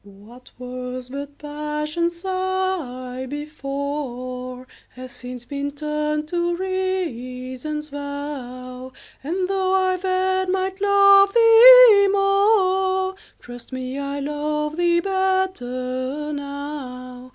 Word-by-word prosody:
What 205 Hz, +5 st, -16 dB
was 250 Hz, 0 st, -7 dB
but 280 Hz, +1 st, -7 dB
Passion's 300 Hz, +3 st, -3 dB
sigh 370 Hz, -10 st, -3 dB
before, 275 Hz, -4 st, -5 dB, 0.3 s
Has 255 Hz, 0 st, -9 dB
since 245 Hz, 0 st, -9 dB
been 280 Hz, +2 st, -4 dB
turned 300 Hz, +1 st, -2 dB
to 345 Hz, 0 st, 0 dB
Reason's 305 Hz, -6 st, -4 dB
vow; 260 Hz, -3 st, -7 dB, 0.3 s
And, 365 Hz, +6 st, -2 dB
though 380 Hz, -1 st, 0 dB
I 370 Hz, -1 st, +2 dB
then 375 Hz, 0 st, 0 dB
might 380 Hz, +1 st, -2 dB
love 400 Hz, 0 st, +6 dB
thee 460 Hz, -2 st, +9 dB
more, 385 Hz, -1 st, +2 dB, 0.3 s
Trust 245 Hz, +1 st, -12 dB
me, 260 Hz, +1 st, -5 dB
I 280 Hz, 0 st, -4 dB
love 300 Hz, +1 st, -2 dB
thee 345 Hz, 0 st, +2 dB
better 300 Hz, -8 st, -2 dB
now. 275 Hz, -3 st, -7 dB
300 Hz, 95 wpm, -22 LUFS, 255-375 Hz, 0.3 s, thee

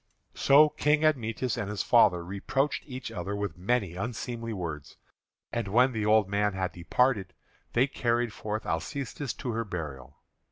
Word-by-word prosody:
So 145 Hz, +3 st, +6 dB
King 150 Hz, +1 st, +2 dB
Admetus 125 Hz, -4 st, 0 dB
and 105 Hz, -, -3 dB
his 105 Hz, -1 st, -2 dB
father 85 Hz, -1 st, +4 dB
reproached 135 Hz, +10 st, -1 dB
each 130 Hz, -3 st, -6 dB
other 100 Hz, -1 st, -4 dB
with 100 Hz, -5 st, -3 dB
many 100 Hz, 0 st, 0 dB
unseemly 115 Hz, +2 st, -4 dB
words. 80 Hz, -8 st, -6 dB, 0.5 s
And 115 Hz, -3 st, -2 dB
when 125 Hz, +6 st, +4 dB
the 110 Hz, -3 st, -2 dB
old 105 Hz, -2 st, +4 dB
man 105 Hz, +1 st, +1 dB
had 95 Hz, -1 st, -2 dB
departed, 100 Hz, +2 st, 0 dB, 0.4 s
they 125 Hz, +3 st, +4 dB
carried 120 Hz, -4 st, 0 dB
forth 110 Hz, +1 st, -4 dB
Alcestis 130 Hz, -, -3 dB
to 125 Hz, -, -4 dB
her 115 Hz, 0 st, -1 dB
burial. 75 Hz, -, -7 dB
110 Hz, 155 wpm, -28 LUFS, 95-125 Hz, 0.5 s, So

